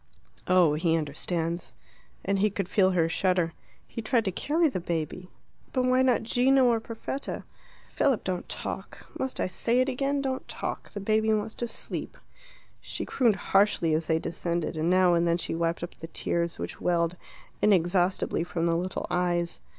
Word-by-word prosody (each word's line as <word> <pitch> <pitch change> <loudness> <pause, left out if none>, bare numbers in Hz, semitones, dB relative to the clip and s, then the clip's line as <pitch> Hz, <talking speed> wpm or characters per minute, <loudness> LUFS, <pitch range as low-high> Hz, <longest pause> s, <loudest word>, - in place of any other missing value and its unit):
"Oh, 180 -4 +5
he 165 +2 +2
understands." 165 +3 -2 0.5
And 195 0 +1
he 210 +2 +3
could 195 -2 -3
feel 190 -1 +3
her 175 -3 +2
shudder. 175 -1 +1 0.3
"He 230 - -6
tried 225 +1 +1
to 190 - 0
carry 315 - +2
the 255 -10 -2
baby 170 +1 -3 0.2
" - - -33
"But 255 - +2
why 255 0 +4
not 255 -3 +3
Gino 255 +3 +4
or 235 -2 +3
Perfetta?" 230 +4 -5 0.4
"Philip, 270 -5 +1
don't 180 -1 -3
talk. - - -6
Must 265 - -3
I - - +1
say 230 +7 0
it 255 - +3
again? 275 +2 0
Don't 265 -1 -3
talk. - - -5
The 205 - -6
baby 220 +2 +2
wants 215 0 0
to 240 - -3
sleep." - - -5 0.6
She - - -5
crooned 235 -6 +2
harshly 195 -4 +2
as 155 0 0
they 160 - +3
descended, 170 0 -2
and 160 +2 0
now 185 -1 +5
and 170 0 +2
then 170 0 +3
she 175 - -3
wiped 165 +1 -1
up 175 - -5
the 165 - -9
tears 170 +1 -2
which - - -6
welled 170 -1 +1 0.5
inexhaustibly 180 -3 +2
from 170 0 -2
the 165 -1 +2
little 180 +2 -2
eyes. 175 -1 0
185 Hz, 180 wpm, -28 LUFS, 170-225 Hz, 0.6 s, Oh